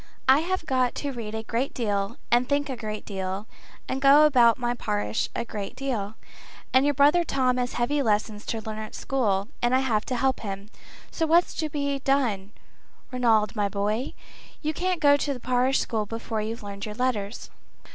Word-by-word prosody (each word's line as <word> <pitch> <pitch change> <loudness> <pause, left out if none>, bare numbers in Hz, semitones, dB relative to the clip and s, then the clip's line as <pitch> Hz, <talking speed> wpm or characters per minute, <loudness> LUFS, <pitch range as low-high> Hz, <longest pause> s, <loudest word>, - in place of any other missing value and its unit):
I 265 +2 +7
have 355 +1 -2
got 255 -3 +1
to 285 - -3
read 225 -4 -6
a 220 - -4
great 235 +4 -2
deal 200 -4 -1
and 245 +1 +3
think 285 0 +1
a - - -3
great 215 -2 -6
deal, 190 0 -4 0.4
and 265 - -3
go 285 +2 +7
about 240 -6 +5
my 240 -1 -1
parish 105 - -2
a - - -2
good 205 -3 -6
deal. 225 -6 -3 0.6
And 260 +2 +5
your 290 0 +2
brother 290 +6 +5
Tom 255 -5 +1
has 245 0 -1
heavy 285 +5 0
lessons 210 -2 0
to 225 - -2
learn 215 0 -6
at 215 0 -7
school, 210 -6 0
and 240 +1 +3
I 260 - +3
have 220 -5 +1
to 255 - -2
help 265 +2 +1
him. 200 0 -6 0.4
So 325 - -1
what's 340 +2 +4
to 310 -2 -2
be 280 -1 -2
done, 240 -8 0 0.6
Ranald, 230 -4 +2
my 205 -2 +1
boy? 210 +5 -2 0.5
You 310 +1 0
can't 360 +1 -1
go 285 -1 +6
to 285 -1 -2
the - - -8
parish 255 +2 +2
school 215 -2 -1
before 225 0 -3
you've 220 +1 -5
learned 200 0 -6
your 210 - -6
letters." 235 -4 -2
240 Hz, 195 wpm, -26 LUFS, 215-275 Hz, 0.6 s, I